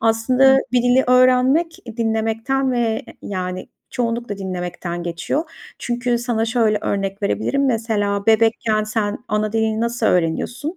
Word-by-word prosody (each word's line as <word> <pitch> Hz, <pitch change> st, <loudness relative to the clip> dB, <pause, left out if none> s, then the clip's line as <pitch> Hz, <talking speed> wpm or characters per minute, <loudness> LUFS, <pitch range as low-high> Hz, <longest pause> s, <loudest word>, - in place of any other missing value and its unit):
Aslında 250 Hz, +4 st, +4 dB
bir 245 Hz, -1 st, +3 dB
dili 245 Hz, +2 st, +3 dB
öğrenmek 255 Hz, +6 st, +3 dB, 0.2 s
dinlemekten 225 Hz, +4 st, 0 dB
ve, 230 Hz, -2 st, 0 dB, 0.2 s
yani, 185 Hz, -1 st, -5 dB, 0.2 s
çoğunlukla 235 Hz, -3 st, -3 dB
dinlemekten 180 Hz, -2 st, -5 dB
geçiyor. 175 Hz, -, -2 dB, 0.3 s
Çünkü 240 Hz, 0 st, -1 dB
sana 235 Hz, -2 st, -1 dB
şöyle 225 Hz, -2 st, +1 dB
örnek 195 Hz, 0 st, -2 dB
verebilirim. 275 Hz, +7 st, 0 dB
Mesela 210 Hz, -4 st, -1 dB
bebekken 220 Hz, -1 st, +2 dB
sen 215 Hz, -1 st, -2 dB
ana 210 Hz, 0 st, -1 dB
dilini 220 Hz, 0 st, 0 dB
nasıl 235 Hz, -1 st, -1 dB
öğreniyorsun? 210 Hz, -, -1 dB
225 Hz, 125 wpm, -20 LUFS, 205-245 Hz, 0.3 s, Aslında